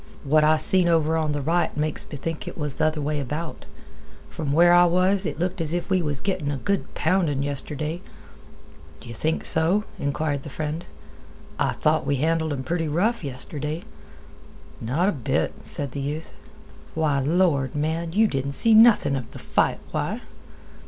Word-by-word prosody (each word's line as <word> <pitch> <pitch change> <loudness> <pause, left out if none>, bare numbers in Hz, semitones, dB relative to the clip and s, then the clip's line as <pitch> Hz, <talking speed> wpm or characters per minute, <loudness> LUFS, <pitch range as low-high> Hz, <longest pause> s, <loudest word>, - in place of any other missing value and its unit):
"What 155 +2 +3
I 155 +1 +4
seen 180 +3 +5
over 160 -1 +2
on 155 -2 0
th' 145 -2 -3
right 170 0 0
makes 150 0 -2
me 145 - -6
think 165 +3 -5
it - - -7
was 150 -3 -2
th' - - -6
other 155 0 +1
way 150 +1 -2
about. 150 +5 -5 0.6
From 150 -4 -4
where 175 +4 +5
I 175 0 +6
was, 185 +2 +3
it - - -5
looked 180 +2 -2
as 160 +1 +1
if 175 +2 -4
we 185 -1 +3
was 145 -4 -2
gettin' 185 -7 -2
a 145 - -2
good 200 +8 -2
poundin' 160 -5 0
yestirday." 150 +4 +1 1.0
"D'yeh 120 - -10
think 160 +7 -2
so?" 170 +6 +2 0.2
inquired 145 0 -2
the 150 - -9
friend. 155 +3 -4 0.7
"I - - +1
thought - - 0
we 145 - +1
handled 160 +3 0
'em 135 -2 -3
pretty 165 +3 -2
rough 185 +9 0
yestirday." 150 +4 -3 1.0
"Not 140 +11 0
a - - +3
bit," 135 - -1
said 140 -3 -4
the 140 - -5
youth. 150 +4 -5 0.6
"Why, 155 -3 +1
lord, 145 -3 +1
man, 160 +3 -2
you 220 +3 +4
didn't 140 -4 -3
see 225 +10 +6
nothing 220 -10 +6
of 125 -4 -6
the - - -9
fight. - - 0
Why!" - - -3
155 Hz, 180 wpm, -24 LUFS, 145-175 Hz, 1.0 s, I